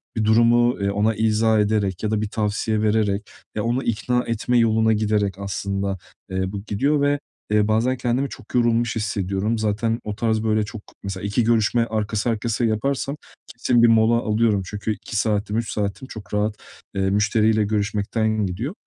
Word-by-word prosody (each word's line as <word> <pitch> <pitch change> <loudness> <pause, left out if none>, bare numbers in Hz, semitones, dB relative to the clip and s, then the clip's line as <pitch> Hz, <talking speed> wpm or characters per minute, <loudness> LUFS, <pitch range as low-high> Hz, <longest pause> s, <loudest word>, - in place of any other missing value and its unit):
bir 110 - 0
durumu, 120 +2 +4
eee, 100 - +1
ona 105 +2 +1
izah 110 +1 +2
ederek 105 -3 0
ya 110 - 0
da 110 -1 0
bir 110 - -2
tavsiye 105 0 -1
vererek, 105 -1 +1 0.3
ya 105 - -1
onu 120 +3 0
ikna 125 +2 0
etme 115 +2 0
yoluna 110 -1 +3
giderek 105 -3 0
aslında, 100 0 -3 0.3
eee, 95 0 -2
bu 100 -1 -6
gidiyor 140 +8 +1
ve, 145 0 +2 0.3
eee, 105 -1 +3
bazen 115 +4 +1
kendimi 125 +3 0
çok - - -11
yorulmuş 120 -1 +2
hissediyorum. 100 0 -1
Zaten 110 +2 0
o 105 -1 -4
tarz 110 0 0
böyle, 110 -1 +2
çok 110 0 -8 0.2
mesela 95 -1 -5
2 100 +4 +1
görüşme 115 +1 +2
arkası 110 0 -1
arkasıya 115 +1 0
yaparsam 135 +6 -1 0.3
kesin 120 0 +1
bir - - +8
mola 115 0 +4
alıyorum; 110 -2 +1
çünkü 105 +3 -3
2 110 - -9
saatim, 105 0 0
3 115 -1 -2
saatim 105 +5 -3
çok 105 -7 -10
rahat, 105 +1 0 0.4
eee, 95 -1 +1
müşteriyle 110 +2 +2
görüşmekten 105 +1 0
gidiyor. 110 - -4
110 Hz, 170 wpm, -22 LUFS, 105-115 Hz, 0.4 s, bir